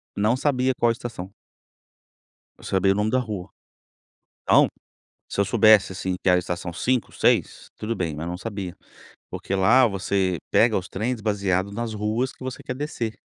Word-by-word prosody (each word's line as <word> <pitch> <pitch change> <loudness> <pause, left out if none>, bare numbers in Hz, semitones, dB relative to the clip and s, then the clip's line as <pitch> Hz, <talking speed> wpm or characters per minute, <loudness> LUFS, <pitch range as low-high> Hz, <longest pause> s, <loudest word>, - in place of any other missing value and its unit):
Não 105 +4 +2
sabia 130 -2 +1
qual 120 -1 +4
estação. 115 -5 -6 1.3
Eu - - -16
sabia 95 0 +2
o - - +1
nome 105 +1 0
da 130 - +3
rua. 105 -6 -5 0.9
Então, - - +5 0.6
se - - -2
eu - - +4
soubesse 105 0 +5
assim 95 0 -3
que 95 - +3
a 90 - +5
estação 90 0 -4
5, 125 +8 0
6 - - +1
tudo 115 +2 -3
bem 85 -4 -2
mas 80 +3 -5
não 90 - -4
sabia. 95 -4 -6 0.5
Porque 95 - -4
lá 115 +7 +5
você 95 -2 0
pega 115 -1 +4
os 95 - -2
trens 115 +4 -3
baseado 100 -2 0
nas 115 +1 -4
ruas 110 +5 -1
que - - -12
você 130 0 -6
quer 130 - -5
descer. 125 -6 -4
105 Hz, 170 wpm, -24 LUFS, 95-120 Hz, 1.3 s, Então